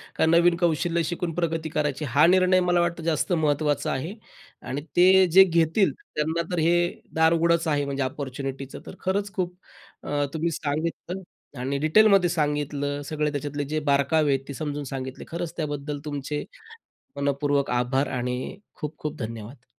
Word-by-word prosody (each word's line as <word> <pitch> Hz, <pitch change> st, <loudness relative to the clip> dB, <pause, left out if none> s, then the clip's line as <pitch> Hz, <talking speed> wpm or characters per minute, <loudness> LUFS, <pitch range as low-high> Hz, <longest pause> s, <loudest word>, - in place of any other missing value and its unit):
का -, -, +3 dB
नवीन 170 Hz, +1 st, +5 dB
कौशल्य 170 Hz, 0 st, +1 dB
शिकून 170 Hz, +1 st, -3 dB
प्रगती 165 Hz, -2 st, -1 dB
करायची 150 Hz, 0 st, -1 dB
हा 150 Hz, +3 st, +6 dB
निर्णय 185 Hz, 0 st, +5 dB
मला 175 Hz, -1 st, +2 dB
वाटतं 170 Hz, -1 st, -1 dB
जास्त 165 Hz, +2 st, 0 dB
महत्त्वाचा 150 Hz, -2 st, +1 dB
आहे. 160 Hz, +9 st, -3 dB, 0.5 s
आणि 140 Hz, +3 st, -4 dB, 0.2 s
ते 185 Hz, +1 st, +7 dB
जे 190 Hz, +2 st, +9 dB
घेतील 170 Hz, +2 st, +2 dB, 0.2 s
त्यांना 160 Hz, +2 st, 0 dB
तर 175 Hz, -, 0 dB
हे 170 Hz, +2 st, +3 dB, 0.4 s
दार 160 Hz, +1 st, +4 dB
उघडंच 170 Hz, 0 st, +2 dB
आहे 145 Hz, -2 st, +1 dB
म्हणजे 140 Hz, -1 st, -2 dB
अपॉर्च्युनिटीच. 135 Hz, 0 st, -5 dB
तर -, -, -9 dB
खरंच 200 Hz, +1 st, -1 dB
खूप 180 Hz, -1 st, -2 dB, 0.5 s
अ, 145 Hz, 0 st, 0 dB
तुम्ही 165 Hz, +1 st, -1 dB
सांगितलं 165 Hz, +5 st, -3 dB, 0.4 s
आणि 135 Hz, +2 st, -1 dB
डिटेलमध्ये 195 Hz, +3 st, +5 dB
सांगितलं. 145 Hz, -2 st, -1 dB
सगळे 150 Hz, 0 st, -1 dB
त्याच्यातले 145 Hz, 0 st, -3 dB
जे 155 Hz, -, +1 dB
बारकावे 140 Hz, +2 st, +3 dB
आहेत 135 Hz, 0 st, -3 dB
ते 140 Hz, -, -6 dB
समजून 145 Hz, +1 st, -4 dB
सांगितले. 130 Hz, 0 st, -6 dB
खरंच 170 Hz, 0 st, -4 dB
त्याबद्दल 145 Hz, -2 st, -3 dB
तुमचे 145 Hz, 0 st, -3 dB, 0.7 s
मनःपूर्वक 140 Hz, 0 st, 0 dB
आभार 125 Hz, +3 st, +1 dB
आणि 125 Hz, +8 st, -3 dB, 0.2 s
खूप 150 Hz, 0 st, -6 dB
खूप 150 Hz, 0 st, -5 dB
धन्यवाद. 115 Hz, +3 st, -7 dB
150 Hz, 155 wpm, -25 LUFS, 140-170 Hz, 0.7 s, जे